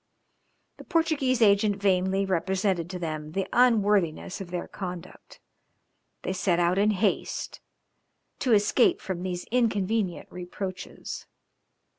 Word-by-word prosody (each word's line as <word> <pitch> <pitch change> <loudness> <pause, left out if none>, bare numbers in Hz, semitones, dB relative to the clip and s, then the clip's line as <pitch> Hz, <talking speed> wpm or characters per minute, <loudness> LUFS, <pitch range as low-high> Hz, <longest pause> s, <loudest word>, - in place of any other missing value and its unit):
The - - -11
Portuguese 285 -7 +1
agent 205 0 +4
vainly 195 0 +1
represented 190 -1 0
to 185 - -5
them 155 -3 -5
the 195 +1 -1
unworthiness 205 -8 +2
of 185 - -7
their 175 0 -4
conduct, 180 -2 -8 0.8
they 185 - -2
set 185 -2 +1
out 175 +2 +2
in 210 +1 +4
haste, 210 0 -1 0.8
to 250 -4 +2
escape 215 - +4
from 185 -2 -5
these 180 -1 -4
inconvenient 220 -5 0
reproaches. 185 +1 -6
195 Hz, 115 wpm, -27 LUFS, 180-210 Hz, 0.8 s, agent